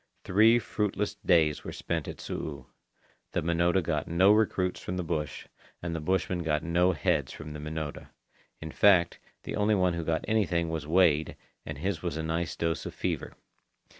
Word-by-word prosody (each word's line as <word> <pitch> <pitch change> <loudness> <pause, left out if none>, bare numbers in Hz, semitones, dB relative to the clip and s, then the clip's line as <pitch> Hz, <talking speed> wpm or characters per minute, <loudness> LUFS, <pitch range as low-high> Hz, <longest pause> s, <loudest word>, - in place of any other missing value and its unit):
Three 110 +5 +5
fruitless 105 -2 -2
days 80 -6 +2
were - - -6
spent - - -3
at - - -7
Su'u. 70 -4 -5 0.7
The - - 0
Minota 85 +2 +2
got 75 -2 -1
no 90 +4 +5
recruits 100 -4 +1
from 90 - -5
the 90 - -1
bush, 75 -3 -3 0.3
and 85 -1 -4
the - - -2
bushmen 90 +2 0
got 75 -2 0
no 90 +2 +2
heads 75 - 0
from 75 -1 -8
the 75 - -7
Minota. 75 0 -5 0.5
In 80 0 -7
fact, 90 -3 +4 0.2
the - - -4
only 105 +1 +2
one 90 -2 +2
who 85 -1 -3
got 80 0 -1
anything 90 -6 +1
was 80 -2 -4
Wada, 80 -3 +3 0.3
and 75 - -5
his 90 +2 -2
was 85 -3 -3
a 80 - -3
nice 80 +2 -2
dose 85 -1 -2
of - - -8
fever. - - -3
85 Hz, 180 wpm, -29 LUFS, 80-95 Hz, 0.7 s, Three